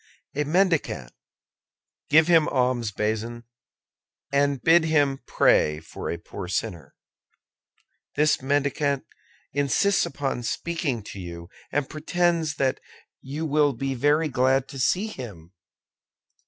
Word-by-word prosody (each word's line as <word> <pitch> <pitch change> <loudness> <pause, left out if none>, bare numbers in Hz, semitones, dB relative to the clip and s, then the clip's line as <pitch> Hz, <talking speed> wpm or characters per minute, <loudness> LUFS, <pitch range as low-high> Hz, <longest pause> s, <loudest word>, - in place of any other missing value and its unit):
"A 150 +1 -1
mendicant." 175 +1 +1 1.0
"Give 155 +1 +6
him 165 -3 +5
alms, 125 -4 0
Bazin, 110 +3 -2 0.9
and 140 -1 +2
bid 165 +5 +5
him 145 -4 +2
pray 75 0 +3
for 80 - -7
a 85 - -2
poor 90 +2 -8
sinner." 90 -5 -4 1.2
"This 150 -1 +3
mendicant 140 0 0 0.5
insists 145 +8 +2
upon 135 -3 -3
speaking 140 - -2
to 100 - -9
you, 85 -1 -8 0.2
and 145 -2 0
pretends 165 0 0
that 135 -1 0 0.4
you 145 +4 -4
will 150 -1 +3
be 135 +3 -3
very 145 +5 +2
glad 130 0 +2
to 135 -1 -8
see 185 +10 +2
him." 100 - -9
140 Hz, 115 wpm, -25 LUFS, 120-155 Hz, 1.2 s, Give